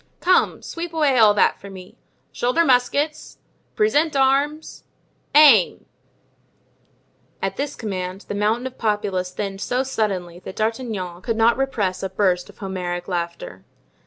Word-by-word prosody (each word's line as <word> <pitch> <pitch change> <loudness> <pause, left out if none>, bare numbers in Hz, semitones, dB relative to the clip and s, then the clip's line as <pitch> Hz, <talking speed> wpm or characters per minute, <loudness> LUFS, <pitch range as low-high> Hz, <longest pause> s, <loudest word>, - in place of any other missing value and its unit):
"Come, 365 +1 +2
sweep 335 0 -6
away 285 -5 +3
all 210 -2 +6
that - - +2
for 200 - -10
me! 185 -1 -12 0.4
Shoulder 255 +8 +1
muskets! 285 +4 0 0.4
Present 330 -8 +2
arms! 280 +3 0 0.5
Aim——" 280 - +6 1.5
At - - -3
this 285 0 -3
command 190 -3 -5
the - - -7
mountain 215 +4 0
of 260 0 -7
populace 205 -4 -1
thinned 195 +1 -5
so 250 +6 0
suddenly 195 -9 -3
that 185 - -9
D'Artagnan 215 -6 -3
could 225 +3 -2
not 230 +1 +4
repress 215 -9 -1
a 190 - -3
burst 185 -2 0
of - - -16
Homeric 180 -3 -4
laughter. 170 - -5
215 Hz, 135 wpm, -22 LUFS, 185-270 Hz, 1.5 s, all